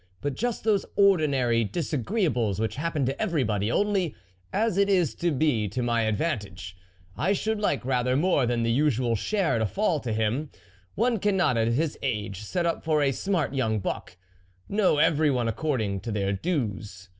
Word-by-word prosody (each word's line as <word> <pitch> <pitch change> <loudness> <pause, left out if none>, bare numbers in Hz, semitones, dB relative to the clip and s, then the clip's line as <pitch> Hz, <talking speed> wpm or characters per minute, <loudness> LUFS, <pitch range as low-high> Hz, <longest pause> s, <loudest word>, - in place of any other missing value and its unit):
but 145 +5 -2
just 240 - -2
those 210 -2 +2
ordinary 140 - +3
dis 155 - -3
agreeables 125 - 0
which 110 0 -1
happen 155 -2 -1
to 135 +2 -2
everybody; 115 - 0
only, 195 - 0 0.4
as 220 -1 +1
it 200 +1 +3
is 180 -7 +2
to 175 - -1
be 135 -7 +1
to 125 +6 -3
my 120 -1 +1
advantage, 105 - -3 0.4
I 190 +5 +1
should 215 +2 -1
like 145 - 0
rather 125 -1 +1
more 145 -4 +2
than 120 -1 0
the 115 - +1
usual 125 -3 +1
share 180 - 0
to 110 - +1
fall 190 - 0
to 120 -4 -4
him; 110 +7 -1 0.5
one 230 +1 +1
cannot 190 -10 +2
at 115 -1 +1
his 145 +6 0
age 105 -6 -3
set 170 - -2
up 170 - -1
for 155 -2 +2
a 135 - +2
smart 165 -1 -1
young 115 -5 0
buck; 95 -2 -5 0.5
no, 200 -6 +2
every 155 0 +3
one 125 -4 0
according 115 -5 -1
to 115 - -5
their 100 -1 0
dues 100 - -3
135 Hz, 180 wpm, -26 LUFS, 115-175 Hz, 0.5 s, ordinary